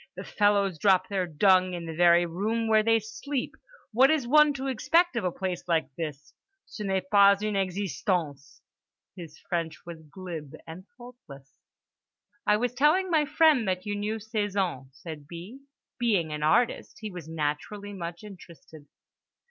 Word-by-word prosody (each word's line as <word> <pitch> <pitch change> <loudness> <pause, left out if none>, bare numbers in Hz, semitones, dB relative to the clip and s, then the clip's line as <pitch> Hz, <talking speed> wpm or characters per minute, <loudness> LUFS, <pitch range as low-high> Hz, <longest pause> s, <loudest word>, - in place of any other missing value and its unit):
The - - -7
fellows 200 -4 +1
drop 185 -1 +3
their 190 -3 -1
dung 185 +2 +3
in 170 -1 -6
the 165 - -6
very 175 +1 +4
room 215 +7 -2
where 220 -1 +4
they 225 +1 +3
sleep. 225 +5 -5 0.4
What 260 +4 +5
is 305 -6 +1
one 300 +3 +6
to 270 -1 -5
expect 330 +6 +2
of 230 - -1
a 180 - 0
place 185 -1 -4
like 160 -5 0
this? 150 -4 -6 0.3
Ce - - -12
n'est 190 -2 -2
pas 200 -1 +6
une 215 -1 -1
existence"—his 180 -3 -5
French 165 -3 -3
was 170 -2 -9
glib 160 -2 -9
and 170 +4 -10
faultless. 235 - -14 1.0
"I 210 - +4
was 245 +2 -1
telling 310 +8 +2
my 310 -2 +3
friend 300 -6 +3
that 185 +1 -2
you 205 0 -2
knew 210 +2 -2
Cézanne," 205 - -2
said 150 +1 -10
B. 175 - -10 0.4
"Being 195 -10 +1
an 150 - -5
artist 160 +11 +1
he 215 -1 -5
was 175 -4 -9
naturally 160 +7 -4
much 170 -1 -7
interested." 170 -6 -14
190 Hz, 155 wpm, -27 LUFS, 170-220 Hz, 1.0 s, one